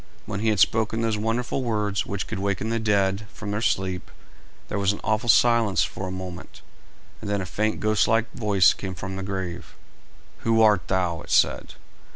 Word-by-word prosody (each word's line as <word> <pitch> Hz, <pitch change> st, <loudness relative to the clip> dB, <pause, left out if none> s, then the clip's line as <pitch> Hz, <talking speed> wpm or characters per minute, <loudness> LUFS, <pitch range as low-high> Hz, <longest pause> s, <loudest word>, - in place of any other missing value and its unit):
When 100 Hz, -2 st, -4 dB
he 110 Hz, +1 st, +1 dB
had 105 Hz, -3 st, +1 dB
spoken 110 Hz, +2 st, +2 dB
those 115 Hz, -1 st, +1 dB
wonderful 115 Hz, +5 st, -1 dB
words 105 Hz, -4 st, -1 dB
which 100 Hz, -2 st, -3 dB
could -, -, -5 dB
waken 100 Hz, +2 st, -1 dB
the 115 Hz, -, 0 dB
dead 100 Hz, -1 st, +1 dB
from 105 Hz, -2 st, -6 dB
their 105 Hz, +1 st, -2 dB
sleep, 95 Hz, -5 st, -1 dB, 0.6 s
there 105 Hz, -, -3 dB
was 100 Hz, 0 st, +2 dB
an -, -, -8 dB
awful 110 Hz, +2 st, 0 dB
silence 115 Hz, -4 st, +4 dB
for 95 Hz, -, -4 dB
a -, -, -5 dB
moment, 95 Hz, -1 st, -8 dB, 0.6 s
and -, -, -5 dB
then 100 Hz, 0 st, 0 dB
a 95 Hz, -, -3 dB
faint 110 Hz, +6 st, -1 dB
ghost 110 Hz, -1 st, +2 dB
like 115 Hz, 0 st, +3 dB
voice 100 Hz, -5 st, +4 dB
came 95 Hz, -1 st, -6 dB
from 95 Hz, +3 st, -6 dB
the 95 Hz, -, -4 dB
grave. 95 Hz, -3 st, -5 dB, 0.6 s
"Who 115 Hz, 0 st, +2 dB
art 105 Hz, -4 st, +4 dB
thou?" 90 Hz, -3 st, 0 dB
it -, -, -13 dB
said. -, -, +2 dB
105 Hz, 195 wpm, -24 LUFS, 95-110 Hz, 0.6 s, silence